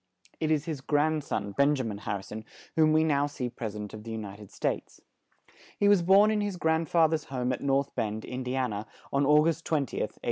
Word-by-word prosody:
It 155 Hz, -, 0 dB
is 155 Hz, -1 st, +1 dB
his 155 Hz, -5 st, -4 dB
grand 150 Hz, +2 st, +1 dB
son, 100 Hz, -6 st, -3 dB
Ben 140 Hz, +7 st, +3 dB
ja 130 Hz, -, -2 dB
min 105 Hz, -3 st, -4 dB
Har 100 Hz, -, -3 dB
ri 95 Hz, -, -10 dB
son, 110 Hz, +2 st, -7 dB, 0.3 s
whom 155 Hz, -1 st, +5 dB
we 155 Hz, 0 st, +4 dB
now 145 Hz, -2 st, +2 dB
see 130 Hz, -4 st, -4 dB
pres 110 Hz, -3 st, -5 dB
i -, -, -5 dB
dent 105 Hz, -1 st, -6 dB
of 105 Hz, -1 st, -8 dB
the 115 Hz, -, -8 dB
U 110 Hz, -, -3 dB
ni 100 Hz, -2 st, -6 dB
ted 105 Hz, -1 st, -13 dB
States. -, -, -3 dB, 0.8 s
He 205 Hz, -, +3 dB
was 205 Hz, -3 st, +5 dB
born 195 Hz, +5 st, +6 dB
in 215 Hz, -1 st, +1 dB
his 205 Hz, -3 st, -2 dB
grand 160 Hz, -1 st, +1 dB
fa 165 Hz, -2 st, +5 dB
ther's 155 Hz, -1 st, -2 dB
home 130 Hz, -1 st, -1 dB
at -, -, -5 dB
North 140 Hz, 0 st, +1 dB
Bend, 110 Hz, 0 st, -2 dB
In 125 Hz, +1 st, -5 dB
di 125 Hz, 0 st, -3 dB
an 130 Hz, -4 st, 0 dB
a, 105 Hz, +1 st, -5 dB, 0.3 s
on 140 Hz, 0 st, +2 dB
Au 150 Hz, +1 st, +6 dB
gust 165 Hz, +1 st, 0 dB
20th, 145 Hz, -6 st, -1 dB, 0.2 s
1833. -, -, -21 dB
140 Hz, 260 wpm, -28 LUFS, 110-160 Hz, 0.8 s, born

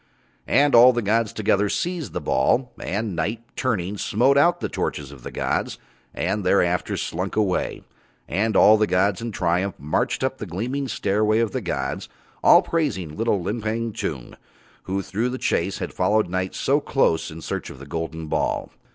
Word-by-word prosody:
And 145 Hz, 0 st, +3 dB
all 120 Hz, +2 st, +8 dB
the 120 Hz, -1 st, -1 dB
gods 110 Hz, +1 st, +1 dB
together 105 Hz, -1 st, +1 dB
seized 175 Hz, -, -2 dB
the -, -, -2 dB
ball, 105 Hz, -, +1 dB
and 100 Hz, -1 st, -2 dB
Night 105 Hz, +8 st, -2 dB
turning 105 Hz, -6 st, -1 dB
smote 125 Hz, +6 st, +2 dB
out 175 Hz, +5 st, +4 dB
the -, -, -2 dB
torches 70 Hz, -1 st, -3 dB
of 70 Hz, -3 st, -13 dB
the -, -, -7 dB
gods -, -, -2 dB, 0.3 s
and 95 Hz, +4 st, -2 dB
thereafter 90 Hz, -1 st, +1 dB
slunk 90 Hz, +3 st, -3 dB
away; 100 Hz, -4 st, 0 dB, 0.4 s
and 105 Hz, +6 st, 0 dB
all 110 Hz, +1 st, +7 dB
the 110 Hz, 0 st, +2 dB
gods 95 Hz, +1 st, +1 dB
in 115 Hz, 0 st, -4 dB
triumph 90 Hz, +1 st, 0 dB
marched 75 Hz, -, -1 dB
up 130 Hz, 0 st, -1 dB
the 105 Hz, -, -5 dB
gleaming 125 Hz, +11 st, -3 dB
stairway 110 Hz, -1 st, +1 dB
of 115 Hz, -2 st, +1 dB
the 130 Hz, -, -3 dB
gods, 70 Hz, -8 st, -3 dB, 0.3 s
all -, -, +7 dB
praising 95 Hz, -, -2 dB
little 110 Hz, -4 st, 0 dB
Limpang 110 Hz, +3 st, -2 dB
Tung, 70 Hz, -10 st, -5 dB, 0.5 s
who 95 Hz, +1 st, -2 dB
through 110 Hz, +7 st, -1 dB
the 130 Hz, -, -4 dB
chase 95 Hz, -5 st, 0 dB
had -, -, -5 dB
followed 105 Hz, +4 st, +2 dB
Night 95 Hz, 0 st, -2 dB
so 140 Hz, +2 st, +2 dB
close 135 Hz, -, +1 dB
in 80 Hz, -, -9 dB
search -, -, -4 dB
of -, -, -10 dB
the 70 Hz, -, -10 dB
golden 80 Hz, +2 st, -4 dB
ball. 75 Hz, -, -1 dB
105 Hz, 175 wpm, -23 LUFS, 90-115 Hz, 0.5 s, all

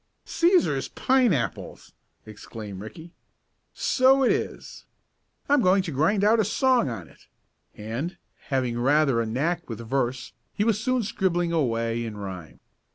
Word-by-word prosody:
"Cæsar's 350 Hz, +1 st, +2 dB
pineapples!" 245 Hz, -, 0 dB, 0.3 s
exclaimed 105 Hz, -2 st, -9 dB
Ricky. 160 Hz, +11 st, -10 dB, 0.6 s
"So 265 Hz, +1 st, +3 dB
it 250 Hz, -, +4 dB
is. -, -, -4 dB, 0.6 s
I'm 285 Hz, -1 st, +4 dB
going 190 Hz, -1 st, +3 dB
to 175 Hz, -, -5 dB
grind 160 Hz, +9 st, +1 dB
out 220 Hz, +2 st, +4 dB
a -, -, +4 dB
song 245 Hz, -, +2 dB
on 95 Hz, -9 st, -7 dB
it," -, -, -22 dB, 0.5 s
and, 120 Hz, -, -5 dB, 0.3 s
having 125 Hz, -4 st, -1 dB
rather 135 Hz, -1 st, +3 dB
a 115 Hz, -, -2 dB
knack 160 Hz, +9 st, -2 dB
with 115 Hz, -, -5 dB
verse, 125 Hz, +1 st, -2 dB, 0.2 s
he 205 Hz, -, +1 dB
was 220 Hz, -1 st, 0 dB
soon 255 Hz, -1 st, +1 dB
scribbling 175 Hz, -4 st, -1 dB
away 115 Hz, -7 st, 0 dB
in 110 Hz, -2 st, -6 dB
rhyme. 95 Hz, -5 st, -8 dB
155 Hz, 140 wpm, -25 LUFS, -, 0.6 s, it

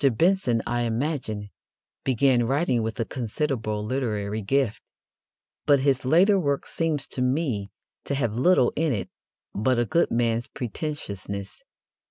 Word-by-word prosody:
Benson, 145 Hz, -, +2 dB
I 120 Hz, 0 st, -1 dB
imagine, 115 Hz, -4 st, -2 dB, 0.5 s
began 125 Hz, -2 st, +3 dB
writing 135 Hz, -2 st, +1 dB
with 110 Hz, +3 st, -3 dB
a 115 Hz, -, +1 dB
considerable 115 Hz, -4 st, -2 dB
literary 110 Hz, -4 st, -2 dB
gift, 130 Hz, +1 st, 0 dB, 0.9 s
but 140 Hz, -2 st, +5 dB
his 135 Hz, -2 st, +2 dB
later 180 Hz, +9 st, +5 dB
work 140 Hz, -5 st, 0 dB
seems 160 Hz, -4 st, -1 dB
to 125 Hz, -, -4 dB
me 125 Hz, -6 st, 0 dB, 0.4 s
to 140 Hz, -, -1 dB
have 120 Hz, -6 st, 0 dB
little 130 Hz, 0 st, +4 dB
in 155 Hz, -2 st, +1 dB
it 100 Hz, -, -4 dB, 0.4 s
but 125 Hz, +5 st, +1 dB
a 120 Hz, -, +2 dB
good 170 Hz, +9 st, +2 dB
man's 115 Hz, 0 st, 0 dB
pretentiousness. 100 Hz, -, -5 dB
125 Hz, 135 wpm, -25 LUFS, 110-145 Hz, 0.9 s, but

